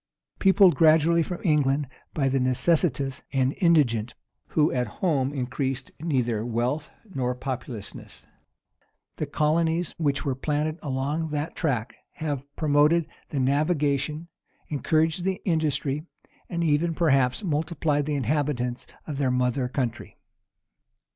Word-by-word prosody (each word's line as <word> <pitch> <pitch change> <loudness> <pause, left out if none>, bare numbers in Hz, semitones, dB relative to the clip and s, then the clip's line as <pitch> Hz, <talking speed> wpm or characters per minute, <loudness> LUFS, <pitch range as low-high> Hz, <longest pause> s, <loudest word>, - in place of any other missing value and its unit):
Peopled 190 -2 +6
gradually 165 +1 +5
from 175 +2 -3
England 145 -4 +2 0.3
by 140 -3 +1
the 135 0 +1
necessitous 135 +1 +1
and 130 0 +1
indigent, 125 - +3 0.3
who 155 -1 +2
at 125 -2 0
home 140 -7 +1
increased 135 0 -3
neither 125 -9 0
wealth 120 +6 -1 0.2
nor 125 -3 -1
populousness, 125 -5 -7 0.9
the 155 - -2
colonies 160 +3 +1
which 145 -2 0
were 135 - +1
planted 150 +4 -2
along 145 +3 -2
that 150 +1 -3
tract 130 -8 -1 0.2
have 150 -5 -3
promoted 150 +2 +3 0.2
the 145 - -2
navigation, 145 +2 +1 0.4
encouraged 160 +3 +1
the 190 0 -1
industry, 155 -2 0 0.4
and 170 -1 -1
even 160 +1 +1
perhaps 135 -2 +2
multiplied 155 -3 0
the 150 - 0
inhabitants 130 -2 -1 0.2
of 145 -3 -5
their 135 -2 +2
mother 125 0 +1
country. 125 -3 -3
145 Hz, 120 wpm, -26 LUFS, 130-160 Hz, 0.9 s, Peopled